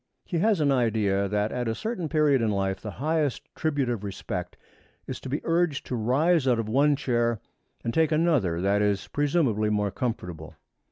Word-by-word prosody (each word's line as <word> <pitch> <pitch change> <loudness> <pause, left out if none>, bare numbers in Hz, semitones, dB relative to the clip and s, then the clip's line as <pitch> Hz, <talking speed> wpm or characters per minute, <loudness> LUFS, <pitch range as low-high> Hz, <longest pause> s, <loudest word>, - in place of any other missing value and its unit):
He 170 - -2
has 210 0 +3
an 145 -2 +3
idea 110 -6 +1
that 105 +1 0
at 125 -1 -2
a 115 - -1
certain 200 - -3
period 150 -4 +3
in 115 - +1
life 95 -1 -1
the 110 - -5
highest 150 0 0
tribute 145 -4 -1
of 120 -4 -2
respect 95 -2 -5 0.5
is - - -5
to - - -8
be 145 +4 -2
urged 165 -3 +1
to 125 - -3
rise 135 +7 +2
out 125 -2 +4
of 115 -2 -2
one 140 +6 +3
chair 120 -4 0 0.4
and 115 - -2
take 160 -1 +2
another 150 - +2
that 100 +2 +2
is 100 -1 0
presumably 140 -8 +1
more 105 -1 0
comfortable. 90 -9 -4
120 Hz, 185 wpm, -26 LUFS, 105-150 Hz, 0.5 s, out